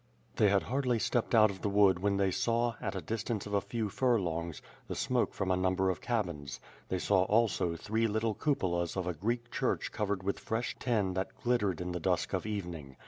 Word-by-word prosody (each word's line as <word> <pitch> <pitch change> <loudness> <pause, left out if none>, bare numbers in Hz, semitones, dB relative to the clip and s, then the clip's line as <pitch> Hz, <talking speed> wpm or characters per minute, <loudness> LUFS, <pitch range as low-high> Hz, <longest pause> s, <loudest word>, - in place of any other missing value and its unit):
They 105 - +5
had 100 -1 +3
hardly 125 -1 0
stepped 120 +1 0
out 110 -2 +6
of 95 - -10
the 105 - 0
wood 100 -3 +4
when 100 +1 +1
they 100 -1 +2
saw, 115 +3 +1
at - - -3
a - - -4
distance 115 -1 -2
of 105 - -6
a 100 - +3
few 110 +2 -2
furlongs, 85 - 0 0.3
the - - -4
smoke - - +1
from 95 -1 -2
a - - +4
number 95 +1 +2
of 90 - -6
cabins. 85 - -2 0.3
They 95 - 0
saw 95 +1 +3
also 105 -5 +2
three 110 +6 0
little 110 +1 0
cupolas 90 - 0
of 95 - -1
a 90 - -1
Greek 115 +8 -2
church - - -1
covered 100 -3 -2
with 100 +1 -1
fresh 115 +2 -2
tin 105 -7 +1
that 95 +1 -4
glittered 105 -8 +1
in 90 0 -3
the 90 - -3
dusk - - 0
of - - -1
evening. 85 -10 -5
100 Hz, 210 wpm, -32 LUFS, 90-115 Hz, 0.3 s, out